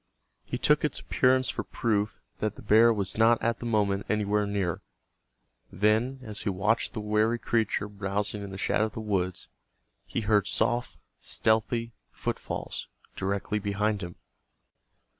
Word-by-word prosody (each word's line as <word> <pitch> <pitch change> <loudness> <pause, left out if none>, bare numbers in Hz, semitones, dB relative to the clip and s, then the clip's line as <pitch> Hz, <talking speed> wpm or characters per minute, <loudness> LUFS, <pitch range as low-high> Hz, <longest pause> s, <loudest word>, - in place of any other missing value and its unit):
He - - -4
took - - +3
its - - 0
appearance 130 0 +2
for - - -2
proof 105 -3 -1 0.2
that 110 -1 -1
the - - -12
bear 115 +2 +6
was 100 -2 -1
not 115 +1 +5
at 115 0 0
the 120 - -4
moment 100 -3 +1
anywhere 105 -1 +1
near. 100 -4 -1 0.9
Then, 110 +7 +1
as 105 -3 -5
he 105 - -1
watched 100 +4 +1
the - - -4
wary 105 +2 +2
creature 110 -3 0
browsing 100 +1 -2
in 100 - -6
the 95 - -7
shadow 105 - +1
of 110 - -5
the - - -5
woods, 95 -4 -1 0.6
he - - -2
heard 105 -2 +2
soft, 120 +1 0 0.2
stealthy 115 +1 0 0.2
footfalls - - -4 0.3
directly 100 +2 -1
behind 105 +1 0
him. 85 -1 -6
105 Hz, 150 wpm, -28 LUFS, 100-115 Hz, 0.9 s, bear